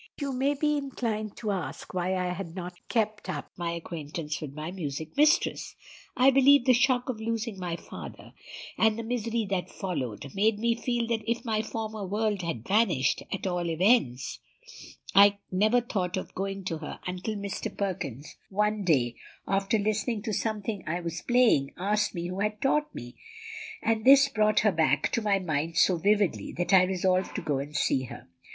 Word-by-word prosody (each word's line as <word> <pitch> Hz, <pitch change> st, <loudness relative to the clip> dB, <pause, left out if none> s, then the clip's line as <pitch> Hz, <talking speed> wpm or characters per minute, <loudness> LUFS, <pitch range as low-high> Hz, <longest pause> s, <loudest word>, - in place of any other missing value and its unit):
"You 280 Hz, -2 st, -2 dB
may 270 Hz, +3 st, +1 dB
be 300 Hz, +1 st, +1 dB
inclined 230 Hz, -6 st, -3 dB
to 215 Hz, -3 st, -2 dB
ask 180 Hz, -8 st, -5 dB
why 185 Hz, +1 st, 0 dB
I 180 Hz, -1 st, -1 dB
had 180 Hz, -3 st, -7 dB
not 180 Hz, -1 st, -5 dB, 0.2 s
kept 215 Hz, -3 st, -1 dB
up 150 Hz, -6 st, -5 dB
my 170 Hz, -1 st, -3 dB
acquaintance 160 Hz, -2 st, -5 dB
with 150 Hz, -3 st, -5 dB
my 155 Hz, +4 st, -6 dB
music 155 Hz, -3 st, -5 dB
mistress. 305 Hz, +4 st, +2 dB, 0.4 s
I 260 Hz, +2 st, +6 dB
believe 275 Hz, 0 st, +6 dB
the 255 Hz, -, +6 dB
shock 250 Hz, 0 st, +2 dB
of 235 Hz, -4 st, -4 dB
losing 225 Hz, -2 st, -3 dB
my 175 Hz, -2 st, -3 dB
father, -, -, -10 dB, 0.5 s
and 220 Hz, -1 st, +4 dB
the 230 Hz, -, -4 dB
misery 230 Hz, -1 st, -1 dB
that 185 Hz, -2 st, -1 dB
followed, 135 Hz, -, -4 dB
made 210 Hz, +2 st, +2 dB
me 230 Hz, +2 st, +2 dB
feel 235 Hz, 0 st, -1 dB
as 225 Hz, -, 0 dB
if 235 Hz, +2 st, -1 dB
my 215 Hz, -2 st, +1 dB
former 220 Hz, -1 st, -5 dB
world 205 Hz, +1 st, -1 dB
had 165 Hz, -10 st, -4 dB
vanished; 195 Hz, -, +2 dB
at 195 Hz, -, -3 dB
all 175 Hz, -2 st, -1 dB
events, 165 Hz, -, +2 dB, 0.7 s
I 200 Hz, +1 st, +7 dB
never 215 Hz, +6 st, +3 dB
thought 190 Hz, -5 st, -2 dB
of 185 Hz, -, -6 dB
going 195 Hz, 0 st, -3 dB
to 165 Hz, -3 st, -3 dB
her 155 Hz, -, -7 dB
until 185 Hz, +4 st, -3 dB
Mr. 200 Hz, +1 st, -5 dB
Perkins 155 Hz, -, -4 dB
one 210 Hz, +1 st, 0 dB
day, 130 Hz, -9 st, +2 dB, 0.3 s
after 195 Hz, +3 st, +1 dB
listening 215 Hz, +1 st, -1 dB
to 220 Hz, -2 st, -3 dB
something 210 Hz, -2 st, -2 dB
I 170 Hz, +3 st, -1 dB
was 170 Hz, -1 st, -4 dB
playing, 240 Hz, -, +3 dB
asked 210 Hz, +3 st, 0 dB
me 170 Hz, 0 st, -3 dB
who 185 Hz, +2 st, -5 dB
had 210 Hz, +1 st, -1 dB
taught 300 Hz, +4 st, +1 dB
me; 120 Hz, +1 st, -8 dB, 0.7 s
and 220 Hz, -1 st, +1 dB
this 275 Hz, +1 st, +7 dB
brought 215 Hz, -4 st, +3 dB
her 215 Hz, -, +4 dB
back 155 Hz, -4 st, +2 dB
to 235 Hz, -, 0 dB
my 205 Hz, -2 st, +2 dB
mind 165 Hz, -3 st, -2 dB
so 185 Hz, -, +4 dB
vividly 205 Hz, +1 st, +1 dB
that 175 Hz, +2 st, -1 dB
I 185 Hz, -1 st, +7 dB
resolved 185 Hz, 0 st, 0 dB
to 205 Hz, -, -2 dB
go 145 Hz, -4 st, 0 dB
and 145 Hz, +2 st, -6 dB
see 130 Hz, -3 st, +1 dB
her. -, -, -10 dB
200 Hz, 185 wpm, -28 LUFS, 170-225 Hz, 0.7 s, I